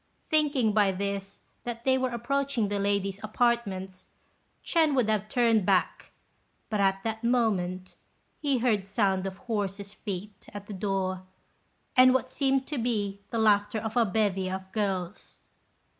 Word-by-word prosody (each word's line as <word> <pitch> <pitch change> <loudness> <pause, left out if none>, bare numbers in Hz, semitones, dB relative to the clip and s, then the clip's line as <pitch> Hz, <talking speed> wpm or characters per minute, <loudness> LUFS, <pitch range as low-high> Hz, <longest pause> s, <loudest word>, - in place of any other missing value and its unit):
Thinking 290 -7 +3
by 205 -2 +4
this 200 +1 -4 0.2
that 235 -1 -5
they 260 0 +3
were 260 0 0
approaching 245 -1 -1
the 205 0 -1
ladies' 200 -1 0
apartments, 210 -5 -1 0.6
Ch'ên 320 -4 +3
would 250 -5 +2
have 215 -1 0
turned 230 -4 +3
back, 185 -1 +1 0.6
but 210 - 0
at 195 0 +2
that 220 0 -3
moment 190 -7 0 0.4
he 285 -3 +1
heard 230 -5 +1
sounds 195 -1 0
of 190 0 -6
horses' 200 -3 -3
feet 205 -1 -7
at 205 -1 -6
the 205 - -8
door, 190 -1 -2 0.7
and 255 0 +7
what 260 - 0
seemed 270 -1 +1
to 290 -2 -4
be 205 -4 -1
the 230 - -3
laughter 210 -1 +3
of 220 +1 -4
a 240 - +5
bevy 195 -3 0
of 190 0 -6
girls. 195 -3 -3
210 Hz, 150 wpm, -28 LUFS, 195-240 Hz, 0.7 s, and